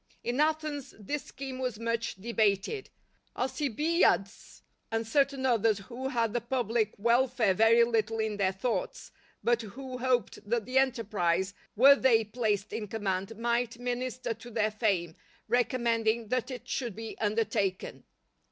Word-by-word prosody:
In 245 +3 -2
Athens 305 -2 0
this 285 +8 -4
scheme 265 -1 -7
was 250 -4 -2
much 230 +1 -2
debated, 220 - 0 0.5
Alcibiades 275 - 0 0.3
and 225 0 -1
certain 275 +2 +1
others 225 -4 +3
who 245 +6 -6
had 230 -4 0
the 240 - 0
public 235 -3 0
welfare 235 -1 +3
very 225 +4 +5
little 225 -1 0
in 220 -1 -1
their 190 -2 +2
thoughts, 210 +5 -3 0.3
but 240 0 +2
who 255 +4 -7
hoped 250 -4 0
that 235 -2 0
the 255 +3 +2
enterprise, 200 -8 0 0.2
were 275 +6 +8
they 240 -5 +4
placed 210 -2 -1
in 215 -2 -3
command, 195 0 -3
might 235 0 0
minister 245 0 -3
to 230 +2 -12
their 215 -2 0
fame, 195 -7 0 0.3
recommending 230 -2 +1
that 255 +1 0
it 250 -2 -7
should 240 -7 -3
be 225 0 -6
undertaken. 210 -3 -1
230 Hz, 140 wpm, -30 LUFS, 215-255 Hz, 0.5 s, were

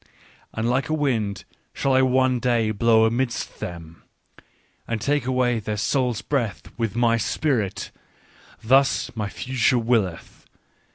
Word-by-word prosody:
" - - -31
And 110 +1 -1
like 130 +4 0
a 155 - +1
wind 115 -10 -1 0.3
shall 135 - 0
I 130 - +5
one 130 -1 +2
day 115 -3 +1
blow 110 +1 +4
amidst 120 +2 -2
them, 85 -5 -8 0.9
and 115 -1 -2
take 145 +3 0
away 125 -2 +1
their 105 0 -4
soul's 125 +1 0
breath 120 -9 -2
with 115 -2 -2
my 120 -1 +3
spirit: 115 -3 -1 0.7
thus 135 +3 +2
my 105 -2 -3
future 125 +3 0
willeth 115 -7 -1
it. - - -44
120 Hz, 145 wpm, -23 LUFS, 110-130 Hz, 0.9 s, I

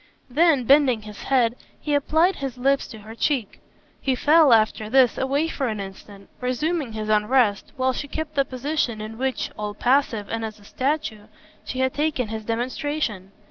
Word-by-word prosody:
Then 300 -1 +4
bending 260 -3 +4
his 210 -1 -10
head 245 -3 +2 0.2
he 295 - -2
applied 320 +6 +2
his 270 -3 -5
lips 275 +2 +1
to 220 - -10
her 215 +1 -11
cheek. 235 -2 -1 0.4
He 265 -2 +1
fell, 300 +2 +5
after 215 -1 +3
this, 260 0 +4
away 280 +4 0
for 275 -4 -2
an 215 -2 -3
instant, 195 0 -10
resuming 260 +1 -1
his 215 -1 -4
unrest, 215 0 +2
while 260 0 +1
she 290 - -5
kept 310 +1 -5
the 275 - +3
position 260 -3 -2
in 215 +2 -7
which, 265 0 -2
all 210 -1 -4
passive 245 -4 +1
and 225 0 -3
as 215 -1 -6
a - - -18
statue, 255 -5 -2 0.4
she 255 - -3
had 260 0 +1
taken 290 -6 -1
his 220 0 -5
demonstration. 235 -3 -3
255 Hz, 180 wpm, -23 LUFS, 220-285 Hz, 0.4 s, fell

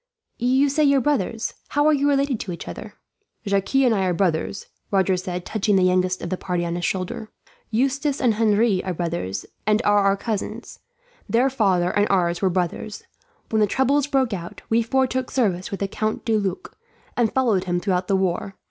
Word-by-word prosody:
"You 260 +4 +3
say 305 +3 +1
both - - +5
your 275 -1 +4
fathers. 230 -5 -1
How 290 0 +1
are 310 - +5
you 285 0 +2
related 275 -4 +1
to 185 - -5
each 170 - -7
other?" - - -8 0.5
"Jacques 200 +4 -1
and 260 -3 +5
I 195 -3 +1
are 180 -1 0
brothers," 180 +1 -1 0.2
Roger 190 -1 +2
said, 180 -1 -4
touching 210 -1 0
the 190 - +4
youngest 185 0 +1
of 175 - -4
the 185 - -1
party 180 -2 -2
on 170 - -2
his 175 0 -4
shoulder. 190 +3 -3 0.4
"Eustace 275 +5 0
and 245 -4 +3
Henri 215 -2 +2
are 185 -2 -3
brothers, 160 - -3 0.2
and 210 0 +4
are 205 0 +4
our 195 0 +3
cousins. 215 -1 -5 0.5
Their 250 +4 +3
father 190 -8 +2
and 205 +1 +2
ours 175 -2 +1
were 190 - +3
brothers. 180 +3 -3 0.5
When 220 - +2
the 210 - +4
troubles 265 +6 +2
broke 265 -5 +1
out, 170 -3 -7
we 225 +1 +3
four 265 +3 +2
took 255 0 -2
service 190 -8 0
with 195 - -6
the 200 - +1
Count 215 +2 -3
de 225 - +2
Luc, 195 -4 -3 0.4
and 235 -3 +2
followed 230 -8 +1
him 175 -1 0
throughout 185 -1 -1
the 195 - +2
war. 190 +1 -1
205 Hz, 200 wpm, -23 LUFS, 185-250 Hz, 0.5 s, both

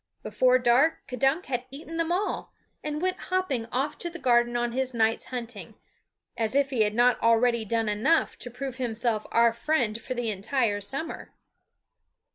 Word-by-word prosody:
Before 255 0 +3
dark 255 +6 +3
K'dunk 270 +7 +1
had 245 -1 -3
eaten 310 +4 -8
them 330 0 0
all, 380 +4 -2 0.3
and 300 +2 -3
went 370 0 0
hopping 330 -11 -1
off 275 +5 -2
to 345 - -3
the 345 - -8
garden 240 -4 +2
on 240 0 -1
his 260 0 -2
night's 225 0 +1
hunting 230 -6 -7 0.6
as 225 +2 -1
if 280 -1 +2
he 245 -4 +1
had 210 0 +2
not 245 +1 +3
already 230 0 +3
done 225 +1 0
enough 225 +11 +2
to 245 - -7
prove 255 +1 -6
himself 235 -3 -1
our 235 0 +4
friend 235 -4 0
for 255 - -5
the 240 -2 -1
entire 210 +1 0
summer. 275 +10 -6
245 Hz, 170 wpm, -27 LUFS, 230-275 Hz, 0.6 s, our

